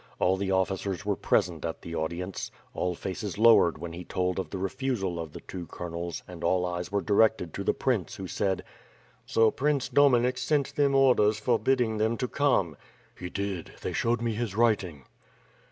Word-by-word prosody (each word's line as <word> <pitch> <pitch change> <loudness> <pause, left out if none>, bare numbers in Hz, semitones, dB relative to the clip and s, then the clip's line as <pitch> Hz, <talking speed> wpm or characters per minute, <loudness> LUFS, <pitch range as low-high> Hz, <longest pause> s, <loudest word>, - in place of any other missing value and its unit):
All 95 +1 +3
the 95 0 -2
officers 95 -1 -1
were - - +1
pre - - +3
sent 85 -4 -9
at 80 -1 -4
the 85 - -7
audience. 85 +4 -3 0.2
All 90 -1 -1
faces 95 +3 -5
lowered 110 -7 +6
when 85 +1 -7
he 90 +1 -7
told 90 +1 -1
of 95 - -4
the 95 - -5
refusal 95 -2 -2
of 80 -2 -5
the - - -9
two 90 -2 -7
colonels 85 -1 -5
and - - -9
all 90 -1 +2
eyes 90 0 -4
were 100 0 +1
directed 105 -5 +2
to - - -4
the - - +1
prince, - - -1
who 95 - -6
said, 95 +1 -1 0.6
"So 115 -1 +4
Prince 145 -1 0
Dominik 125 -3 +4
sent 140 +2 0
them 140 -1 +3
orders 120 -6 +4
forbidding 115 0 +1
them 110 +2 +1
to 125 - -1
come!'' 120 - +1 0.4
"He 90 - -6
did; 100 -3 -4
they - - -2
showed 120 0 0
me 115 -1 0
his 110 -3 -3
writing." 100 - +1
100 Hz, 185 wpm, -28 LUFS, 90-120 Hz, 0.6 s, lowered